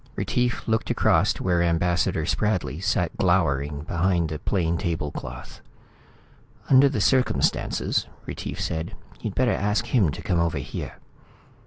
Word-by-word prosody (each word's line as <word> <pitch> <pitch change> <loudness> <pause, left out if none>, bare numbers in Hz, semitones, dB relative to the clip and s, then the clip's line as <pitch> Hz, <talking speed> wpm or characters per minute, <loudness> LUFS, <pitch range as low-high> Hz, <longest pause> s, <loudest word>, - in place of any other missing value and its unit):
Retief 125 -1 -1
looked 110 0 0
across - - +3
to - - -8
where 90 -2 +2
Ambassador 85 -1 +1
Spradley 85 - -1
sat 90 -4 0
glowering 70 +1 +1
behind 85 0 0
the 75 -1 -4
plain 85 -3 0
tablecloth. 75 -7 -5 1.1
"Under 135 +1 +7
the 135 - -2
circumstances," 130 -2 +1 0.2
Retief - - -6
said, 80 +1 -3 0.2
"you'd 105 - -5
better 125 -3 +2
ask 105 0 0
him 105 -10 +2
to 70 - -6
come 85 - +1
over 85 -1 0
here." - - -6
85 Hz, 135 wpm, -25 LUFS, 80-105 Hz, 1.1 s, Under